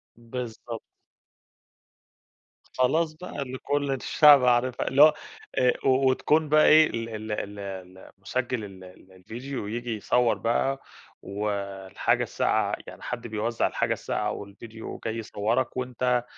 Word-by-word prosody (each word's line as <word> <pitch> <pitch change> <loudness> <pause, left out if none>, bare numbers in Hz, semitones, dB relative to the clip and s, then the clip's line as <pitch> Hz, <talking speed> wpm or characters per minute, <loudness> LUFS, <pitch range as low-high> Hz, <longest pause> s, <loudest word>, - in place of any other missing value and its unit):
بالضبط. 115 -1 -7 2.0
خلاص 155 +5 +2
بقي 160 -1 -7
اللي 130 -1 -5
كُلّ 145 +1 -1
الشعب 140 0 +6
عارفها، 125 0 +2
اللي 135 +2 +3
هو 155 +1 +9 0.4
آآ، 125 -1 +3
وتكون 135 +4 +3
بقي 155 +1 +5
إيه 155 0 +7
ال 115 0 -4
ال 110 -1 -6
ال 105 -1 -4
اللي 95 -1 -9
مُسجِّل 120 +4 -2
ال 95 -2 -10 0.3
الفيديو 115 +6 -7
ييجي 120 +1 -3
يصور 120 +3 +2
بقى، 135 +4 0 0.4
و 105 +2 -3 0.4
الحاجة - - +1
الساقعة - - 0
يعني - - -11
حد 120 -1 -5
بيوزع 110 +1 -1
الحاجة - - 0
الساقعة 105 0 -2
والفيديو 110 +3 -9
وجاي 110 0 -4
يصوّرك، 115 +4 -1
وأنت 125 -1 0
120 Hz, 130 wpm, -26 LUFS, 110-130 Hz, 2.0 s, هو